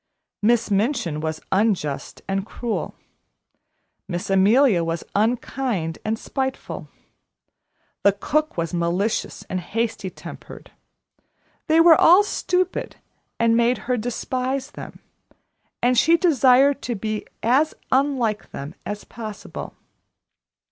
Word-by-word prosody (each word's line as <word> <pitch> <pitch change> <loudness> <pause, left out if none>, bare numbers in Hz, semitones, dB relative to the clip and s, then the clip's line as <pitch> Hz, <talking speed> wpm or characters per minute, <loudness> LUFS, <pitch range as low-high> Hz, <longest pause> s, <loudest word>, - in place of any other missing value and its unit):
Miss 230 0 +2
Minchin 195 - 0
was 155 0 -3
unjust 190 -8 0
and 195 0 -1
cruel, 230 +1 -4 1.1
Miss 175 +1 -4
Amelia 200 0 +4
was 165 0 -3
unkind 220 -5 -1
and 220 +1 -1
spiteful, 265 +3 -4 1.1
the 200 - +5
cook 305 +9 -1
was 165 0 -2
malicious 175 +5 -1
and 185 - -2
hasty 210 +2 -3
tempered - - -11 1.0
they 315 - +4
all 330 +1 +7
were 410 - +5
stupid, 370 -2 -1 0.4
and 230 0 +3
made 235 +1 +3
her 250 - +1
despise 255 +4 -3
them, - - -10 0.8
and 250 +1 +4
she 335 +2 +5
desired 275 -4 +4
to 240 - -3
be 215 +1 -4 0.2
as 270 +7 +3 0.2
unlike 260 -6 +1
them 140 +3 -7
as 205 0 -5
possible. 215 -3 -8
230 Hz, 110 wpm, -23 LUFS, 195-265 Hz, 1.1 s, all